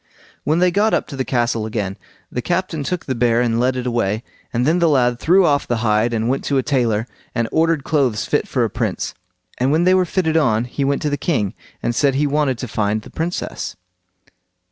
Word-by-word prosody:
When 155 +2 +2
they 180 0 +3
got 210 +4 +3
up - - -1
to 140 - -6
the 135 - -1
castle 120 -3 0
again, 105 -3 -3 0.4
the 125 - -2
captain 175 0 -1
took 180 +5 -3
the 130 - -1
bear 120 -1 +2
and 115 -1 +1
led 130 +1 +2
it 125 -1 -3
away, 115 -3 0 0.3
and 120 +1 0
then 165 +5 +3
the 170 -2 +4
lad 125 -4 +2
threw 185 +3 +4
off 145 -3 +2
the 120 - 0
hide, 110 +2 +2
and 115 -1 -1
went 135 +2 0
to 140 - +1
a 130 - +2
tailor 120 -6 +1 0.3
and 115 -2 +1
ordered 160 -2 +2
clothes 135 -9 +1
fit - - 0
for - - 0
a - - 0
prince; - - -2 0.5
and 130 +2 +2
when 160 +3 +3
they 185 +1 +5
were 185 -1 +3
fitted 165 -2 0
on 120 -8 +2
he 135 +3 -3
went 140 +1 0
to 150 - 0
the 145 - 0
king, 110 - 0 0.3
and 120 - 0
said 140 +1 +2
he 145 +2 +2
wanted 145 -3 +1
to 125 - -5
find 105 0 -1
the - - -13
Princess. 170 +2 -3
130 Hz, 230 wpm, -20 LUFS, 115-160 Hz, 0.5 s, they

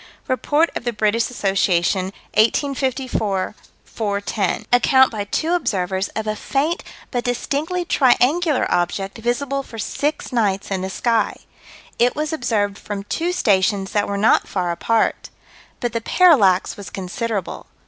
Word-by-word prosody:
Rept. 255 -4 -3 0.5
Brit. 210 -1 +2
Assoc., 230 +1 -2
1854 200 - 0 0.3
410: 200 -2 -2
Account 260 +2 +5
by 210 -3 -3
two 315 +10 -1
observers 195 - 0
of 220 - -2
a 215 0 -1
faint 290 +9 -1 0.3
but 245 -2 -1
distinctly 300 +8 -2
triangular 285 +2 +3
object, 195 +4 -1
visible 275 +4 -1
for 235 -4 -11
six 285 +5 -2
nights 200 -5 0
in 190 -1 -1
the 190 - -3
sky. 225 +2 0 0.6
It 245 +1 +3
was 305 +1 -2
observed 210 -8 -1
from 205 -1 -5
two 335 - -2
stations 195 - +1
that 205 -1 +1
were 200 - -2
not 215 +3 +3
far 180 -3 -1
apart. 225 +6 0 0.5
But 240 -2 -2
the 230 - -1
parallax 225 - +4
was 200 - -9
considerable. 195 +1 -4
225 Hz, 130 wpm, -21 LUFS, 195-265 Hz, 0.6 s, Account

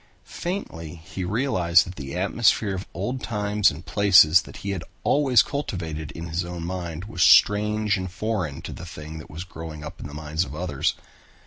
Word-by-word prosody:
Faintly 90 - -5
he 85 +3 -7
realized 90 - +3
that 90 - -8
the 70 -1 -6
atmosphere 100 +2 +2
of 95 +1 -5
old 125 +1 -3
times 105 -3 +2
and 80 +5 -9
places 90 -5 +6
that - - -12
he 100 - -1
had 95 -4 -3 0.2
always 135 -5 +4
cultivated 80 - -4
in 80 - -6
his 85 +1 -2
own 85 -1 -6
mind 85 -1 -5
was 100 -4 -5
strange 105 +7 +5
and 95 0 -4
foreign 95 -8 -3
to - - -6
the - - -9
thing 80 -1 -8
that 75 - -11
was 80 +4 -6
growing 80 -4 -8
up 75 - -8
in - - -6
the 70 - -11
minds 80 +2 -1
of 70 -2 -8
others. 80 -5 -1
90 Hz, 190 wpm, -24 LUFS, 80-105 Hz, 0.2 s, places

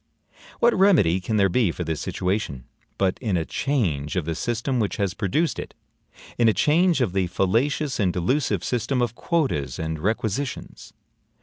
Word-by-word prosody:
What 235 0 +4
remedy 155 - +4
can 105 +4 -2
there 100 -1 +4
be 95 0 +2
for 90 - -5
this 80 -2 -3
situation, 90 - -2 0.3
but 95 -1 0
in 105 -7 0
a 80 - -1
change 85 - -1
of 90 -4 -1
the 85 - -2
system 120 - -2
which 105 -3 -1
has 100 -4 0
produced 135 - 0
it - - -7 0.6
in 115 -1 +5
a - - +3
change 165 0 +3
of 105 -8 0
the 95 -2 +1
fallacious 120 - 0
and 95 -4 +2
delusive 100 - 0
system 125 +2 -1
of 120 -2 -2
quotas 120 - -1
and 80 -1 -3
requisitions? 110 - -3
105 Hz, 170 wpm, -24 LUFS, 90-135 Hz, 0.6 s, in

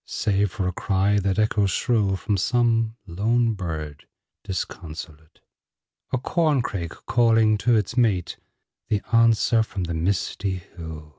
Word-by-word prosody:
Save 100 -2 0
for 100 -5 -2
a - - 0
cry 100 +2 +1
that 95 0 0
echoes 110 -2 +2
shrill 105 -3 +1
From 100 +2 -1
some 115 +2 +1
lone 115 +6 +1
bird 80 -7 -6 0.4
disconsolate; 80 -4 -7 0.7
A - - +1
corncrake 125 - -1
calling 115 -3 +4
to 115 +5 +3
its 105 +2 0
mate; 105 -9 +1 0.5
The 105 -3 0
answer 115 0 +4
from 100 -4 -4
the 85 -1 -3
misty 95 +3 -1
hill. 80 -3 -10
100 Hz, 130 wpm, -24 LUFS, 90-115 Hz, 0.7 s, calling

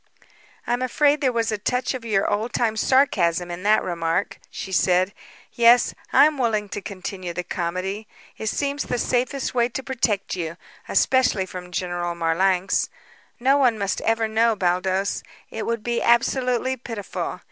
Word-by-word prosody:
"I'm 245 +1 -1
afraid 290 +4 +2
there 265 -3 +2
was 230 -2 0
a 215 - -2
touch 250 +6 -1
of 255 -2 -6
your 210 -4 +1
old 215 +4 -1
time 225 -2 +1
sarcasm 180 -9 +2
in 175 +1 -6
that 210 +2 +3
remark," 170 +1 -2
she 190 - -7
said. 185 +1 +2 0.4
"Yes, 235 +1 +5 0.2
I - - +7
am 300 -2 0
willing 215 -4 0
to 205 - -5
continue 185 -2 -6
the 180 - -3
comedy. 185 +5 -3 0.3
It 220 - -5
seems 285 +5 -1
the 245 - -2
safest 255 +3 -1
way 240 -1 +2
to 265 +2 -5
protect 230 -8 -1
you 165 -2 -4 0.3
especially 255 -7 +3
from 180 -1 -8
General 175 0 -2
Marlanx. 180 +3 +1 0.5
No 265 +3 +4
one 250 -5 +3
must 200 -2 -2
ever 225 0 +1
know, 225 +1 +2
Baldos; 185 +1 0 0.3
it 220 - -4
would 230 -2 -2
be 235 0 -1
absolutely 250 +2 +2
pitiful. 230 -5 -5
215 Hz, 160 wpm, -23 LUFS, 185-245 Hz, 0.5 s, I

